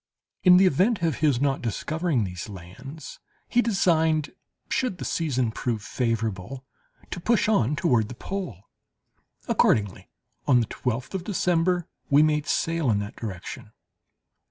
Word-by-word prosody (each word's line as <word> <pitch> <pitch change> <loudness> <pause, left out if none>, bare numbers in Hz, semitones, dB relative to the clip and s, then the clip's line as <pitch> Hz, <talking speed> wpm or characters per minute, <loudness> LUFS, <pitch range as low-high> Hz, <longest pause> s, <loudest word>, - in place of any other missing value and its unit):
In 180 -1 +7
the 190 - +6
event 185 - +2
of 160 -4 +1
his 145 -6 +2
not 140 0 +1
discovering 155 - -1
these 90 0 -6
lands, 110 - -10 0.3
he 245 - +3
designed, 160 -8 +2 0.4
should 250 -8 -1
the - - -6
season 130 -8 0
prove 110 -2 -3
favourable, 115 +1 -2 0.5
to - - -4
push 225 +5 +2
on 150 - +2
toward 125 - +2
the 125 - -7
pole. 135 - -5 0.8
Accordingly, 100 -3 +1 0.4
on 130 -4 +5
the 115 - +1
twelfth 125 - -3
of 190 -2 -3
December, 180 -2 +1 0.2
we 145 +2 +6
made 150 -1 +1
sail 165 -4 0
in 105 - +3
that 105 +1 -5
direction. 95 -6 -7
145 Hz, 140 wpm, -25 LUFS, 115-175 Hz, 0.8 s, In